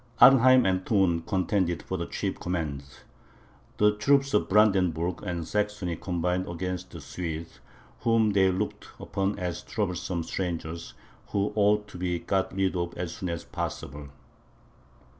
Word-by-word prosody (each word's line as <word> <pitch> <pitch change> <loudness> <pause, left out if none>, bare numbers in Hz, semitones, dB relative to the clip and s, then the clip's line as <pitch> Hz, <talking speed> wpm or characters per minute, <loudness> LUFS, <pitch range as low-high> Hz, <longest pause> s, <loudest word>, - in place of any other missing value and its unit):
Arnheim 130 0 +8
and 95 -1 +1
Thurn 95 -6 +2
contended 90 0 0
for - - -4
the - - -3
chief - - -3
command; 80 -6 -3 0.9
the 105 0 +4
troops 140 +5 +3
of 105 - +2
Brandenburg 90 -5 +3
and 85 -4 -4
Saxony 105 -4 -1
combined 90 +1 -1
against 90 +1 -4
the - - -9
Swedes, 80 -6 -6 0.4
whom 115 -2 +3
they 95 -1 +4
looked 95 +3 -3
upon 100 +1 -2
as 90 -2 -3
troublesome 90 -4 -2
strangers 85 -1 -4 0.3
who 100 0 0
ought 105 0 +3
to 90 - -10
be 90 -1 0
got 95 +2 -1
rid 95 -1 +1
of 85 -1 -3
as 85 -1 -3
soon 90 - -4
as 85 -1 -3
possible. 70 +1 -5
90 Hz, 140 wpm, -27 LUFS, 85-105 Hz, 0.9 s, Arnheim